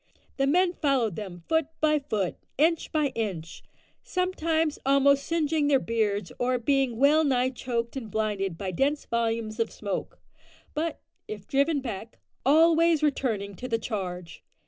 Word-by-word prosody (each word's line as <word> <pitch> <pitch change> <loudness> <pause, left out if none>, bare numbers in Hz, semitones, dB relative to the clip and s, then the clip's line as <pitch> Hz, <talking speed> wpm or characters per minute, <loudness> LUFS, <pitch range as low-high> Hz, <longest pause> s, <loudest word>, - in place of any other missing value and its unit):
The 275 0 +2
men 355 +4 +3
followed 260 - +1
them 180 -5 -7
foot 320 -2 +2
by 305 -1 +3
foot, 215 -10 -2 0.2
inch 325 +3 +2
by 305 -3 +1
inch 190 -9 -4 0.4
sometimes 325 -4 0
almost 275 +1 +4
singeing 315 -2 +1
their 285 -2 +5
beards 220 -4 -1
or 250 +1 +1
being 260 -1 +1
well 295 +5 +5
nigh 260 -3 +2
choked 235 -2 -3
and 240 -5 -5
blinded 200 -4 -1
by 190 0 -3
dense 280 - 0
volumes 230 -1 -1
of 230 - +1
smoke, 200 -3 -4 0.6
but, 320 +1 -2 0.3
if 210 -2 -7
driven 280 +3 +1
back, 225 -3 -6 0.3
always 325 +2 +4
returning 225 -9 0
to 255 - -5
the 230 -2 +1
charge. 180 -7 -5
260 Hz, 145 wpm, -27 LUFS, 215-300 Hz, 0.6 s, their